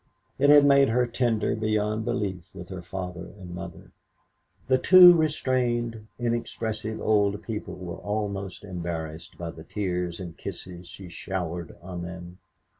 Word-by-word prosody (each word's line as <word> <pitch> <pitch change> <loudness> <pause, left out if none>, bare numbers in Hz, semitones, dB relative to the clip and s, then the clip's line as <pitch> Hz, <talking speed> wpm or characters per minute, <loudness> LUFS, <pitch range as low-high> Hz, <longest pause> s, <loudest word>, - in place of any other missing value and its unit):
It 140 +1 +5
had 145 -1 +8
made 140 -1 +6
her 125 +2 +3
tender 120 -3 0
beyond 110 0 0
belief 95 -4 -2
with 90 0 -9
her 95 -2 -6
father 90 0 -6
and 90 -3 -9
mother. 90 - -8 0.8
The 130 0 +4
two 180 +4 +10
restrained, 125 -8 0
inexpressive 115 -2 -2
old 105 -1 +2
people 110 -2 -5
were 90 -2 -7
almost 100 -2 -3
embarrassed 85 -2 -5
by 85 -1 -5
the 80 -1 -11
tears 90 -3 -3
and 90 -3 -6
the - - -32
kisses 90 -1 -8
she 95 0 -10
showered 85 -1 -5
on 90 -1 -6
them. 90 +1 -8
100 Hz, 145 wpm, -26 LUFS, 90-115 Hz, 0.8 s, two